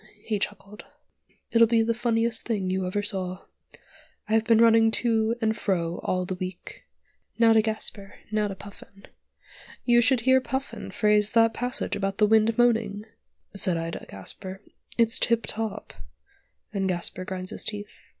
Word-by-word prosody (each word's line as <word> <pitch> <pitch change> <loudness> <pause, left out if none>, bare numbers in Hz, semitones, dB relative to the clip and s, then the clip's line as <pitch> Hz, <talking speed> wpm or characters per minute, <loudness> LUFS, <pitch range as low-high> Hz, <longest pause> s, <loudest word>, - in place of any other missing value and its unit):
he 215 -2 -2
chuckled, 205 +1 -5 0.7
"it'll 230 -1 +6
be 225 0 +3
the 230 +1 +1
funniest 230 -1 +1
thing 200 -5 -2
you 190 0 -1
ever 205 +3 -2
saw. 185 -2 -3 0.8
I've 220 +1 +2
been 230 -1 +4
running 225 0 +5 0.2
to 225 -1 +2
and 220 0 +1
fro 175 -6 -1
all 185 0 -1
the 185 - -4
week. 185 -1 -7 0.5
Now 230 -1 +5
to 220 - +5
Gasper, 215 -2 -3 0.2
now 215 -1 +1
to 195 - -6
Puffin. 200 0 -14 0.8
'You 240 -1 +5
should 250 0 +2
hear 260 +2 +4
Puffin 265 +1 -5
phrase 210 -1 +2
that 225 -1 +4
passage 245 +2 -2
about 195 -1 -2
the 210 - +4
'wind 220 +1 +3
moaning,' 225 -4 +1 0.5
said 185 -3 +1
I 165 0 -3
to - - -7
Gasper, 185 - -5 0.3
'it's 230 -1 +3
tiptop,' 225 -2 -1 0.8
and 195 -2 -1
Gasper 180 +1 -1
grinds 185 0 -5
his - - -5
teeth. 210 -1 -5
215 Hz, 155 wpm, -26 LUFS, 195-230 Hz, 0.8 s, it'll